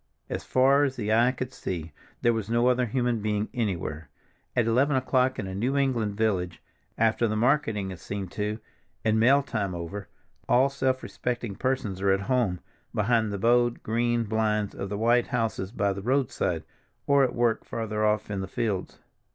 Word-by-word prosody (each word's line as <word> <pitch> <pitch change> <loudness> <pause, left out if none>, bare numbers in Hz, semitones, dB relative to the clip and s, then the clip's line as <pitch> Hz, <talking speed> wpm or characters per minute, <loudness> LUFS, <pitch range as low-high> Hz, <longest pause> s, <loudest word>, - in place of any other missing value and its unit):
As - - -3
far 135 +2 +4
as 135 -2 0
the 110 -3 -1
eye 120 +3 +4
could 130 0 -5
see 85 -3 -5 0.3
there 120 - +4
was 110 -2 -3
no 120 +1 +2
other 125 0 +3
human 120 0 0
being 105 0 -1
anywhere. 90 - -3 0.5
At 125 - +3
eleven 130 +5 +3
o'clock 130 0 +2
in 100 - -3
a 95 - -5
New 125 +8 0
England 120 -7 +1
village, 95 -6 0 0.4
after 115 +1 +2
the 110 - -1
marketing 110 -5 +1
is 90 - -9
seen 100 -1 -4
to 105 +2 -2 0.5
and 110 0 +3
mail 135 +5 +5
time 100 -8 -2
over, 85 +3 -6 0.4
all 125 +4 +5
self 130 -1 -1
respecting 120 -4 -3
persons 120 -8 -2
are 100 - +2
at 95 0 +3
home 110 -6 0 0.3
behind 110 0 +2
the 100 - -2
bowed 120 +3 +2
green 120 +1 +1
blinds 105 -1 0
of 100 - -5
the 100 - -3
white 120 +2 +3
houses 115 -5 -2
by 100 -4 0
the 100 - -6
roadside, 130 +3 0 0.4
or 140 -1 +4
at 125 - 0
work 120 -2 +1
farther 110 -2 -3
off 105 0 +1
in 100 -1 -2
the 95 - -4
fields. 100 -5 -2
115 Hz, 185 wpm, -27 LUFS, 100-125 Hz, 0.5 s, mail